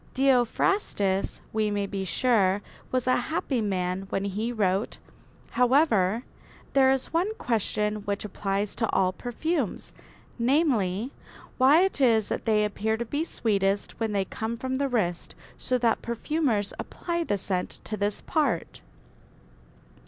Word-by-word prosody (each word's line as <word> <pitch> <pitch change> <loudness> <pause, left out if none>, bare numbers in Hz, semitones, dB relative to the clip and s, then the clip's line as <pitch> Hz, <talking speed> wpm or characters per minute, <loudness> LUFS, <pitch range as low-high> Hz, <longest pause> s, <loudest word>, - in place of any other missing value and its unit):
Theophrastus, 245 - +1
we 215 -1 +1
may 205 -1 -1
be 195 -1 -4
sure, 200 0 +2 0.3
was 255 -1 0
a 255 - +3
happy 260 -1 -1
man 190 -2 -2
when 195 - -1
he 210 +4 -2
wrote: 200 -3 0 0.5
"However, 240 - +3 0.5
there 270 -1 +5
is 265 +3 -1
one 375 +6 +1
question 215 - -1
which 205 0 -3
applies 195 0 -2
to 225 - 0
all 185 -1 +2
perfumes, 310 - -3 0.5
namely, 240 - +1 0.5
why 275 +6 +6
it 385 -7 0
is 225 -5 +4
that - - -3
they 215 -2 +3
appear 215 +2 -1
to 235 - -3
be 290 +7 -1
sweetest 200 - 0
when 225 -2 -1
they 200 -2 0
come 225 +4 -4
from 260 +2 -2
the 280 0 0
wrist; 180 -8 -1 0.2
so 255 - 0
that 235 -2 +1
perfumers 235 -3 -1
apply 340 -1 -3
the 205 -10 0
scent 185 -1 -2
to 215 - -4
this 205 0 -1
part." 280 - -1
220 Hz, 140 wpm, -27 LUFS, 200-260 Hz, 0.5 s, why